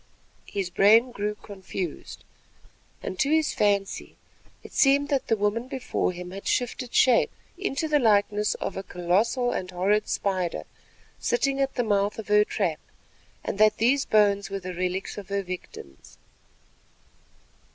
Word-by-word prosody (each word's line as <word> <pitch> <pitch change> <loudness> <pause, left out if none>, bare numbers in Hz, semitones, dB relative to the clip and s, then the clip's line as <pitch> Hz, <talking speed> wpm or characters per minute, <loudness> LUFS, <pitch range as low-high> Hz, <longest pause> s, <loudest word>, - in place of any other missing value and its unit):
His 190 -3 -3
brain 225 +7 +5
grew 210 -2 -3
confused, 190 -5 -7 0.8
and 185 - -5
to 275 - +2
his 315 0 +2
fancy 200 -1 0 0.5
it - - -12
seemed 280 +1 +4
that 275 -3 0
the 225 - +2
woman 210 +4 -1
before 260 -7 -2
him 180 0 -8
had 195 +1 -8
shifted 245 0 -1
shape 250 -3 +4 0.3
into 330 -5 -2
the 300 -1 +3
likeness 210 -2 +2
of - - -4
a 190 - -3
colossal 195 +8 0
and 185 - -3
horrid 195 +4 +1
spider 185 -4 -1 0.6
sitting 275 - 0
at 270 0 -1
the 245 - +1
mouth 205 -2 +1
of 220 -1 -7
her 210 0 +6
trap, 180 -7 -2 0.6
and 195 - -4
that 215 0 +5
these 265 +5 +2
bones 200 -2 +3
were 195 - -3
the 185 -1 -6
relics 185 +3 -3
of 200 - -11
her 200 0 -1
victims. 175 - -9
210 Hz, 150 wpm, -26 LUFS, 190-245 Hz, 0.8 s, her